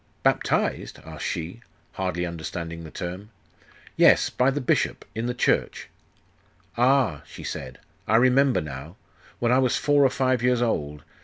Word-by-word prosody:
'Baptized?' - - 0
asked 80 -1 -8
she, 90 +5 -4 0.3
hardly 90 -2 -2
understanding 85 0 -6
the 80 - -9
term. 90 +5 -6 0.7
'Yes - - +5
by 125 +1 +2
the 140 +2 -1
bishop 130 - 0
in 115 +2 -3
the 125 - -1
church.' - - 0 0.9
'Ah,' 125 - +2
she - - -11
said, 65 0 -6 0.3
'I 110 - +3
remember 130 +2 +4
now.... 75 +3 -8 0.4
When 120 0 +1
I 130 - +5
was 130 -2 +2
four 145 -1 +3
or 135 - +5
five 130 -1 0
years 125 0 +2
odd.... 75 -11 -2
110 Hz, 150 wpm, -25 LUFS, 85-125 Hz, 0.9 s, Yes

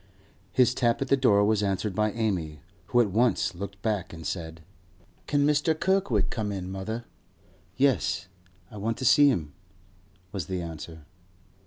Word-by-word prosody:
His 125 -1 +4
tap 120 -2 +1
at 135 - -9
the - - +5
door 105 -7 +4
was 105 -1 +2
answered 100 0 -1
by 105 +2 +1
Amy, 90 -10 -2 0.3
who 120 - +4
at 105 -5 0
once 115 -2 +2
looked 100 +2 -7
back 100 -5 -1
and 80 -1 -9
said: 80 -2 -5 0.7
'Can 145 -1 +2
Mr. 150 +2 +2
Kirkwood 125 - +1
come 105 -3 -2
in, 95 -2 -5
mother?' 110 +5 -5 0.7
'Yes; 130 -9 +1 0.4
I 105 - -9
want 110 +3 -2
to 130 - -4
see 145 +3 +7
him,' 80 - -2 0.8
was 95 -7 -4
the 95 -1 -2
answer. 80 -2 -8
105 Hz, 160 wpm, -27 LUFS, 90-125 Hz, 0.8 s, see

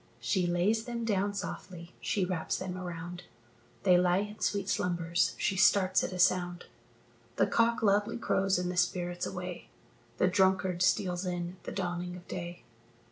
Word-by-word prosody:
She 175 +10 0
lays 200 +6 +1
them 235 -1 -3
down 200 -1 0
softly, 180 -3 -6
she 195 -3 0
wraps 180 -3 -2
them 185 -1 -4
around; 175 0 -6 0.6
They 180 -1 +6
lie 180 0 +3
in 210 +1 -7
sweet 200 -2 0
slumbers, 175 -3 0
she 195 - 0
starts 190 0 +4
at - - -2
a 185 - -5
sound, 175 0 +2 0.7
The - - +3
cock 230 0 +2
loudly 205 +2 +2
crows, 195 -4 +1
and 180 0 -1
the 180 - -6
spirit's 175 0 0
away 180 -1 -6 0.5
The - - +3
drunkard 190 -1 +2
steals 185 -1 +2
in 175 0 -3
at - - -25
the - - -4
dawning 180 -1 -3
of 180 0 -12
day. 175 -1 -6
180 Hz, 165 wpm, -31 LUFS, 175-195 Hz, 0.7 s, They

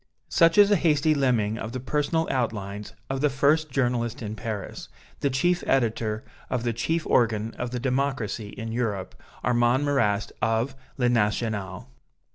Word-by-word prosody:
Such 165 +1 +4
is 205 0 +7
a 205 - +5
hasty 155 -2 +3
limning 120 -6 +1
of 110 +2 -5
the 130 - -3
personal 150 +5 0
outlines 105 -5 -3
of 135 0 -2
the 150 - +3
first 150 +3 +2
journalist 120 -2 -1
in 105 0 -4
Paris, 110 -3 -6 0.3
the 140 - +1
chief 175 +7 +1
editor 115 -4 +1 0.3
of 125 -2 -1
the 120 -1 0
chief 160 +9 -1
organ 110 -2 +2
of 125 - -2
the 125 0 -3
democracy 125 -5 -1
in 115 +1 -6
Europe, 110 -5 -2 0.3
Armand 120 +3 +2
Marrast, 110 -8 +1
of 115 +4 +1 0.2
"Le 125 -2 +2
National." 105 -2 0
120 Hz, 155 wpm, -26 LUFS, 110-140 Hz, 0.3 s, is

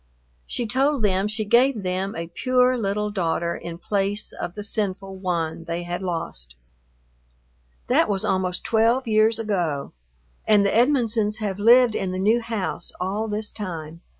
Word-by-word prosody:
She 240 - -2
told 265 +2 +1
them 195 0 +2
she 215 0 -3
gave 240 0 +3
them 185 +2 -2
a 165 - -4
pure 255 +2 +3
little 210 -2 -1
daughter 170 -3 -1
in 170 -1 -7
place 200 +2 -2
of 175 - -6
the 210 - -5
sinful 195 -2 -3
one 170 -3 -2
they 170 0 -3
had 175 +1 -4
lost. 160 - -5 1.3
That - - +3
was 195 -2 0
almost 185 -1 0
twelve 230 +3 +2
years 215 0 +3
ago, 175 -10 -2 0.5
and 205 -2 +5
the 200 - +1
Edmonsons 230 -4 +2
have 205 -3 -3
lived 240 +2 +6
in 190 -3 -2
the 185 - -3
new 215 +5 +2
house 225 -5 -3
all 200 +5 -2
this 210 0 -3
time. 165 -5 -7
205 Hz, 155 wpm, -23 LUFS, 180-225 Hz, 1.3 s, lived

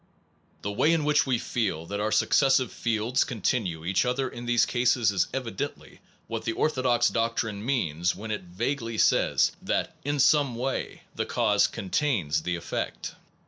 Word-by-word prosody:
The 100 - -2
way 150 +10 +3
in 160 -3 +1
which 150 -1 +3
we 130 -2 +2
feel 105 -9 -2
that 100 +4 -4
our 105 +1 -1
successive 135 0 +3
fields 115 +3 0
continue 100 - -2
each 95 +2 +2
other 125 +2 0
in 120 -1 -8
these 120 -1 +4
cases 115 -6 +2
k 135 - -1
evi 120 -3 -7
dently - - -6 0.3
what - - -5
the 115 - -1
orthodox 130 -5 +2
doctrine 115 -2 -1
means 90 - 0
when 110 +4 -6
it 105 - -2
vaguely 115 +6 -3
says - - +3
that - - -2
in 145 +1 -1
some 140 -2 +3
way 130 +3 -3
the - - -3
cause 105 -4 +2
contains 95 - -1
the 90 +2 -2
effect. 85 - -4
115 Hz, 165 wpm, -27 LUFS, 100-130 Hz, 0.3 s, these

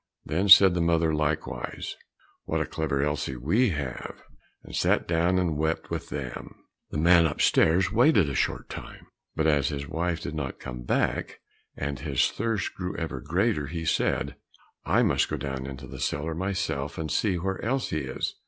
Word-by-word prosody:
Then 95 +6 0
said 95 -1 +10
the 85 - 0
mother 85 -1 +2
likewise, 75 0 -2 0.5
"What - - -1
a - - 0
clever 70 -3 -1
Elsie 75 -2 -2
we 100 - +2
have!" 70 -7 -5 0.4
and - - -9
sat - - +2
down 85 +2 +2
and 85 -5 0
wept 80 +1 -1
with - - -4
them. 65 -4 -6 0.3
The - - -4
man 85 +1 +5
upstairs 85 +4 +3
waited 120 - +4
a 70 - -3
short - - -1
time, - - -9 0.3
but 80 - 0
as 75 -4 +3
his 70 -1 -4
wife 85 +2 -1
did 70 - -5
not 75 -4 -4
come 60 0 -7
back - - -1 0.4
and 70 -1 -3
his 70 -4 +1
thirst 115 -2 -2
grew 90 -1 -5
ever 80 -6 -4
greater, 85 - 0
he 80 +2 -5
said, - - 0 0.5
"I - - +3
must - - +2
go - - -1
into 65 0 -5
the 60 - -9
cellar 80 +3 -2
myself 85 -5 -2
and 80 -2 -3
see 95 +3 +1
where 95 +3 -3
Elsie 115 - -1
is." 65 - -3
80 Hz, 170 wpm, -27 LUFS, 70-90 Hz, 0.5 s, said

